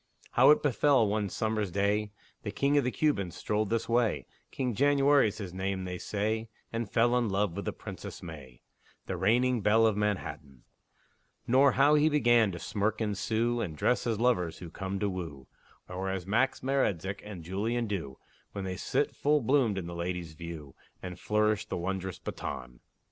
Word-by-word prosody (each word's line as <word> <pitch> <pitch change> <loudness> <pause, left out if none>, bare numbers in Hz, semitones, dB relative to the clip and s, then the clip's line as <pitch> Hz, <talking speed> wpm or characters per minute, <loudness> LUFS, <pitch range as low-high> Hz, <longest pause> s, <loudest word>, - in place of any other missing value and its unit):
How - - +6
it 150 - +5
befell, 135 -3 +3
one 105 -1 0
summer's 110 -1 -1
day, 100 +3 0 0.3
The 105 - -5
king 140 +7 +1
of 145 - +4
the 125 - +1
Cubans 115 - 0
strolled 105 -1 -1
this 115 0 -1
way 120 -1 +1 0.2
King 125 -3 -2
January's 140 -3 +3
his 95 -4 -6
name, 95 0 -2
they 90 -1 -5
say 110 +2 -2 0.2
And 115 -2 -2
fell 120 +1 +3
in 120 -3 +1
love 95 -2 0
with - - -4
the - - -1
Princess - - -9
May, 70 -7 -10 0.4
The 95 - -3
reigning 120 +6 +2
belle 110 +3 +4
of 110 -2 +3
Manhattan; 75 -11 -3 0.8
Nor 135 +2 +5
how 140 +3 +5
he 150 +1 +5
began 120 -7 +4
to 85 - -6
smirk 105 +4 -1
and 105 -2 -1
sue, 115 +4 0
And 80 -8 -4
dress 125 +9 +1
as 110 -3 0
lovers 100 -9 +1
who 85 -3 -9
come 95 0 -4
to 105 - 0
woo, 80 -9 -5 0.4
Or 95 +1 -4
as 95 -2 -3
Max 115 +7 +1
Maretzek 100 -8 0
and 100 -5 -8
Jullien 110 +7 -1
do, 80 -10 -4 0.4
When 100 - -4
they 95 -1 -4
sit - - -1
full 150 +1 +2
bloomed 125 -5 +2
in 95 - -3
the 85 - -6
ladies' 85 -1 -4
view, 80 -4 -8 0.3
And 90 -1 -6
flourish 105 -1 +1
the - - -3
wondrous 95 +1 -3
baton. 60 -1 -6
105 Hz, 180 wpm, -30 LUFS, 90-120 Hz, 0.8 s, How